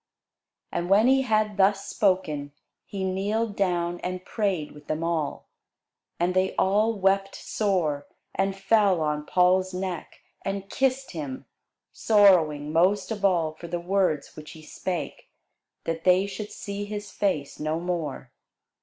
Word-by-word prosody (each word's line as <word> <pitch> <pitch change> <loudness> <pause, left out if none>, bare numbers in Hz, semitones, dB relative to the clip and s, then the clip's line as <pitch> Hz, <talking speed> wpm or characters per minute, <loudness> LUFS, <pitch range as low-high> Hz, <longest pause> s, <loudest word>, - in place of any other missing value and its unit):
And 175 +1 -2
when 205 +3 +5
he 265 +1 +5
had 215 -4 +1
thus 195 0 +3
spoken, 155 -8 0 0.3
he 195 -2 -4
kneeled 205 +3 -1
down, 175 -3 0
and 185 0 -5
prayed 195 -8 -1
with 150 0 -15
them 155 +1 -2
all. 165 -3 -2 0.7
And 175 +1 +1
they 185 +1 +1
all 210 +4 +3
wept 195 +1 +2
sore, 170 -9 -1 0.3
and 195 +1 0
fell 195 -2 +3
on 150 -1 -1
Paul's 185 +1 +3
neck, 185 -3 -5 0.2
and 195 0 -4
kissed 265 0 0
him, 140 -5 -6 0.5
sorrowing 165 -9 +4
most 185 +4 +2
of 205 -2 -4
all 170 -5 +3
for 170 +2 -10
the 175 +1 -3
words 180 -5 0
which 155 0 -10
he 160 - -13
spake, 160 -1 -5 0.5
that 165 0 -3
they 185 +1 +4
should 205 +1 -6
see 200 0 -5
his 205 -1 -6
face 170 -10 -1
no 155 +2 -1
more. 165 -7 -4
185 Hz, 145 wpm, -26 LUFS, 165-200 Hz, 0.7 s, when